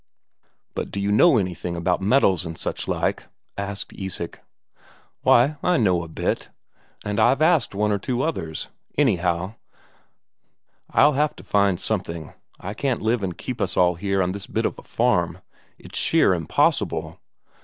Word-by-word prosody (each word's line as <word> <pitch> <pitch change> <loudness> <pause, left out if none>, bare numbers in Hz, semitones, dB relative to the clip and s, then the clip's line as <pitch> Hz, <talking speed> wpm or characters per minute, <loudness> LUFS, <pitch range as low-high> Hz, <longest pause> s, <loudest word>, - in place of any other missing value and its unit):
"But - - -4
do 100 - -4
you 100 +1 0
know 135 +6 +6
anything 90 -3 -2
about 90 +2 0
metals 95 -5 +3
and 80 -1 -6
such - - -4
like?" - - -1 0.3
asked 100 0 -5
Isak. 95 -3 -6 0.8
"Why, 140 +6 +4
I 180 -1 +2
know 95 -7 +2
a 85 - -7
bit. 80 - -2 0.6
And 105 +1 -1
I've 120 +5 +4
asked 155 - +3
one 105 +1 +1
or 100 - +1
two 125 +5 -1
others. 80 - -3 0.3
Anyhow, 95 -7 +1 1.4
I'll 150 +1 +5
have 150 +2 +1
to - - -12
find 100 -3 +2
something; 85 -2 -3 0.3
I 100 - -5
can't 130 +1 -1
live 115 +1 +1
and 90 -3 -3
keep 125 -3 -5
us 95 - -1
all 90 -1 +4
here 95 +2 0
on 90 - -1
this 100 +1 -7
bit - - -1
of - - -2
a - - -10
farm. - - +1 0.4
It's - - -5
sheer - - +4
impossible. 80 -4 0
100 Hz, 160 wpm, -23 LUFS, 90-120 Hz, 1.4 s, know